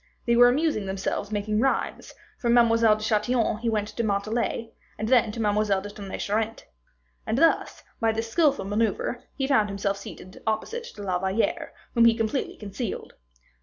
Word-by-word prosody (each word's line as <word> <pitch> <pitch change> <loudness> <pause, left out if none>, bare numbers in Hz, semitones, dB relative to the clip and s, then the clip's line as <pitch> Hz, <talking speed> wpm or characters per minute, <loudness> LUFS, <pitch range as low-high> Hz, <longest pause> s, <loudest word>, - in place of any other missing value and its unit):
They 235 - +3
were 245 +1 +8
amusing 270 -6 0
themselves 195 +1 -3
making 210 0 -1
rhymes; 270 +3 -1 0.2
from 235 -1 +2
Mademoiselle 230 -2 +5
de 215 - -7
Chatillon 220 +1 +1
he 235 0 -1
went 210 -2 0
to 235 - -3
Montalais, 220 +2 -1 0.2
and 215 0 -3
then 235 -3 +4
to 230 - -7
Mademoiselle 210 -2 +1
de 205 - -7
Tonnay 200 -2 -7
Charente. 220 +2 -2 0.6
And 225 - 0
thus, 330 +3 +2 0.2
by 225 -1 +2
this 225 +1 -4
skillful 285 - +2
maneuver, 220 +3 -1
he 270 - -1
found 220 -7 +3
himself 200 0 -1
seated 185 -1 -11
opposite 440 - -2
to 205 - -8
La 185 -2 0
Valliere, 190 +4 -1 0.2
whom 235 -1 +5
he 230 -1 +5
completely 225 +4 -2
concealed. 205 +1 -5
220 Hz, 170 wpm, -26 LUFS, 205-235 Hz, 0.6 s, were